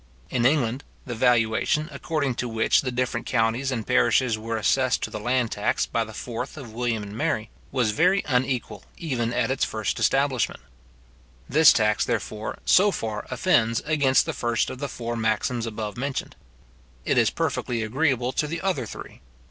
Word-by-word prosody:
In 120 -1 +3
England, 130 -2 +1 0.2
the 125 - -4
valuation, 120 +5 +2
according 140 -1 -2
to 125 - -3
which 110 0 +2
the 130 - -3
different 125 -1 -2
counties 115 +2 +1
and 115 -4 -3
parishes 110 - +3
were 115 +1 -4
assessed 130 +4 +1
to - - -3
the 105 - -5
land 120 +1 0
tax 105 - 0
by 115 - -1
the 110 - -9
4th 120 +5 -6
of 120 -7 -9
William 115 -2 -1
and 100 0 -8
Mary, 110 -1 -1 0.2
was 125 -5 +1
very 180 - +3
unequal 130 -2 -1
even 125 -8 -2
at 125 0 0
its 135 - 0
first 110 -2 -2
establishment. 135 -3 +1 0.9
This 155 +2 +7
tax, 105 -2 +2
therefore, 110 0 -3
so 200 +3 +5
far 110 - -4
offends 115 -11 +2
against 140 -4 +3
the 160 - -3
first 120 -3 0
of 130 - -8
the 140 0 -3
four 120 -1 -4
maxims 115 +1 0
above 110 0 -5
mentioned. 135 +2 -3 0.7
It - - +3
is - - +4
perfectly 115 -2 -2
agreeable 130 +1 0
to 150 - -1
the 165 +2 -4
other 170 -10 -1
three. - - -10
125 Hz, 170 wpm, -25 LUFS, 115-135 Hz, 0.9 s, This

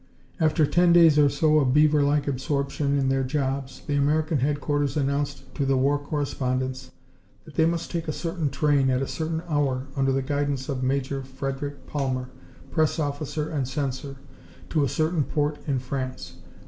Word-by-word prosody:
After 155 -1 +3
ten 175 +3 +4
days 165 -3 +7
or 145 -1 +6
so 155 +2 +3
of 135 -2 +2
beaver 150 0 +5
like 145 +1 +2
absorption 140 +1 -1
in 135 -1 +1
their 135 0 +1
jobs 135 -1 -2
the 145 - -2
American 150 +2 +2
headquarters 145 +1 0
announced 140 -1 -2
to 140 - -1
the 135 -1 +2
war 140 +2 +2
correspondents 130 -3 -2 0.6
that 155 - -13
they 160 +2 +3
must 170 0 -2
take 170 -2 -3
a - - 0
certain 165 -1 -2
train 140 -1 +2
at 130 +1 +1
a - - -3
certain 160 +1 -3
hour, 140 -4 0
under 135 -1 +2
the 135 0 0
guidance 145 -1 -1
of 135 -2 -2
Major 135 +1 -1
Frederick 135 +2 -5
Palmer, 130 -3 -2 0.4
press 155 -2 +1
officer 150 0 -2
and 140 -5 -1
censor, 135 0 -3 0.6
to 155 -3 +2
a 140 - +1
certain 160 0 +1
port 150 +1 -1
in 140 -2 +1
France. 130 0 -5
140 Hz, 175 wpm, -25 LUFS, 135-150 Hz, 0.6 s, days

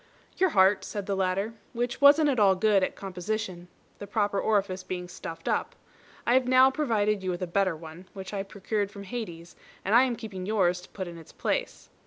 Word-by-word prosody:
"Your 375 0 +3
heart," 190 -5 +4
said 205 -2 -5
the 200 - -1
latter, 195 +3 0 0.2
"which 240 +1 -2
wasn't 290 +2 +7
at 260 -4 +1
all 195 -2 +5
good 200 0 +3
at - - -1
composition, 185 -1 -4 0.3
the 205 - -7
proper 205 -1 0
orifice 195 -3 0
being 180 -1 -5
stuffed 165 -2 -8
up. - - -1 0.5
I 240 - +3
have 255 0 +3
now 255 +1 +6
provided 215 -8 +1
you 185 - -3
with 180 +1 -2
a - - +1
better 185 0 +1
one, 160 +3 -11
which 190 0 -8
I 200 - -1
procured 200 +1 -3
from 200 0 -10
Hades, 180 -6 -7 0.3
and 200 - 0
I 245 +3 +7
am 250 -2 -1
keeping 195 -5 -7
yours 180 -4 +2
to - - -15
put 190 -2 -6
in 170 -1 -8
its 165 - -14
place." - - -3
200 Hz, 210 wpm, -28 LUFS, 185-225 Hz, 0.5 s, wasn't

